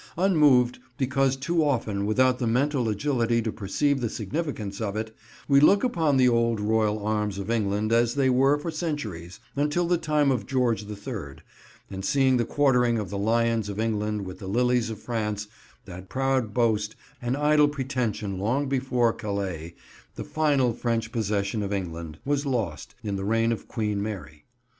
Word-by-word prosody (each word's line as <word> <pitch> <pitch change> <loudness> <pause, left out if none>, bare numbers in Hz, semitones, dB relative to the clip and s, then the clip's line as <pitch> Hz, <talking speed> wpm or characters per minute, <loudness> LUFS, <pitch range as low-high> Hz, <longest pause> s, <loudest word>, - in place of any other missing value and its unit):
Unmoved, 150 -10 +4 0.2
because 135 0 +1
too 165 +5 0
often 110 -8 0
without 125 +3 +3
the 120 - 0
mental 125 0 +1
agility 115 +1 +1
to 110 -1 -1
perceive 135 +8 0
the 120 - -1
significance 110 - -4
of 100 -2 -2
it, 110 0 -4 0.3
we 140 -1 +6
look 195 - +5
upon 160 - +2
the 130 -1 +5
old 115 -2 +2
royal 105 0 +1
arms 105 -2 -1
of 100 +3 -4
England 105 0 0
as 120 0 +3
they 135 -2 +2
were 135 +3 +4
for 155 +3 -4
centuries, 115 - -4 0.2
until 150 +5 +1
the 175 -1 +2
time 150 -3 +2
of 120 -6 -2
George 120 -6 0
the 105 0 -6
Third, 100 - -7 0.5
and 95 0 -5
see 130 +4 +3
the 120 -2 +1
quartering 125 -4 +2
of 105 -4 -4
the 100 - -3
Lions 115 0 +1
of 100 +1 -5
England 105 -2 -1
with 90 0 -8
the 95 - -7
Lilies 125 +2 +1
of 110 - -5
France; 105 -3 -3 0.4
that 90 +1 -10
proud 135 -4 0
boast, 110 -2 +1 0.3
an 120 +1 -1
idle 150 +1 +4
pretension 125 -8 -2
long 125 +8 0
before 125 -3 +1
Calais, 95 -5 -4 0.4
the - - -5
final 140 -6 +1
French 115 -1 -2
possession 105 -1 -1
of 100 -1 -3
England, 85 -5 -4
was 145 0 0
lost, 115 - -3
in 100 -2 -2
the 95 - -4
reign 115 +3 +2
of 115 - -4
Queen 105 -3 -2
Mary. 95 -8 -6
115 Hz, 175 wpm, -26 LUFS, 105-135 Hz, 0.5 s, we